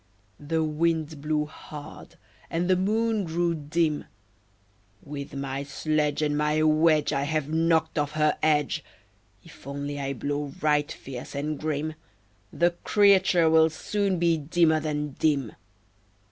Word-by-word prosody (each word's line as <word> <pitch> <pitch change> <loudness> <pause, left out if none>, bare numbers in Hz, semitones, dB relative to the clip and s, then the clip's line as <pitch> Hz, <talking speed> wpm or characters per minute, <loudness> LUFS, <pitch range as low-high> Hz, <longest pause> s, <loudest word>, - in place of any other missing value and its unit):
The 160 +2 -1
Wind 155 -1 -1
blew 150 0 0
hard, 150 -1 -11 0.3
and 170 +2 -1
the 185 - +4
Moon 215 +3 +1
grew 170 0 0
dim. 155 0 -1 1.0
"With 140 -1 -7
my 135 0 -3
sledge 150 +1 -1
And 145 -1 +1
my 150 +1 +1
wedge 155 0 +3
I 140 - 0
have 155 0 -1
knocked 160 -1 +2
off 145 0 -1
her 155 -1 +2
edge! 150 -1 +1 0.6
If 165 - -15
only 140 +1 -4
I 140 0 -2
blow 145 +2 -3
right 150 -1 +1
fierce 130 0 -8
and 150 +1 -3
grim, 155 0 -2 0.6
The 175 +1 +2
creature 195 -4 +4
will 160 0 +5
soon 200 +3 -1
be 170 -1 +2
dimmer 160 +1 +2
than 150 -1 -2
dim." 140 -7 +1
155 Hz, 135 wpm, -26 LUFS, 145-165 Hz, 1.0 s, will